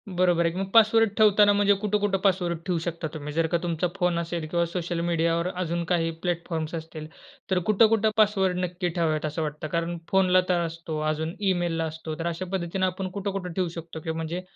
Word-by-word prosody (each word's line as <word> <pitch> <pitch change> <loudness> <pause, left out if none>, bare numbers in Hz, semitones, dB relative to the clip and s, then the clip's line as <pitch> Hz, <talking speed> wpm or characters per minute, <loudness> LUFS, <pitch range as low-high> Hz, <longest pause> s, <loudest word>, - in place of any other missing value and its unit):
बरोबर 175 -2 +3
आहे 165 - +2
की 185 - -4
मग 195 0 -3
पासवर्ड 225 0 +6
ठेवताना 210 -1 +6
म्हणजे 205 0 +4
कुठं-कुठं 205 -1 +1
पासवर्ड 175 -4 +1
ठेवू 180 -3 0
शकता 165 -1 -3
तुम्ही? 150 -1 -6
जर 165 0 +1
का 170 +1 +1
तुमचा 170 +1 0
फोन 180 -2 +1
असेल 170 -1 -3
किंवा 170 0 +1
सोशल 170 0 -3
मीडियावर 170 +1 +1
अजून 170 -1 -2
काही 165 -1 +2
प्लॅटफॉर्म्स 170 -2 -2
असतील, 160 -1 -7 0.4
तर 185 - +3
कुठं-कुठं 220 0 +4
पासवर्ड 195 -4 +3
नक्की 180 0 -3
ठेवावेत, 160 -2 0
असं 155 +2 -3
वाटतं? 150 0 -4
कारण 170 +2 -2
फोनला 185 -1 +4
तर 175 -1 +2
असतो. 165 -1 -5
अजून 160 +4 -2 0.2
ईमेलला 170 -2 -1
असतो. 160 0 -6
तर 170 - -2
अशा 170 +2 -3
पद्धतीने 185 +1 -1
आपण 185 +1 -3
कुठं-कुठं 195 -2 -4
ठेवू 180 0 0
शकतो 165 -1 -7
किंवा 160 0 -4
म्हणजे, 165 +3 -3
175 Hz, 195 wpm, -26 LUFS, 165-190 Hz, 0.4 s, पासवर्ड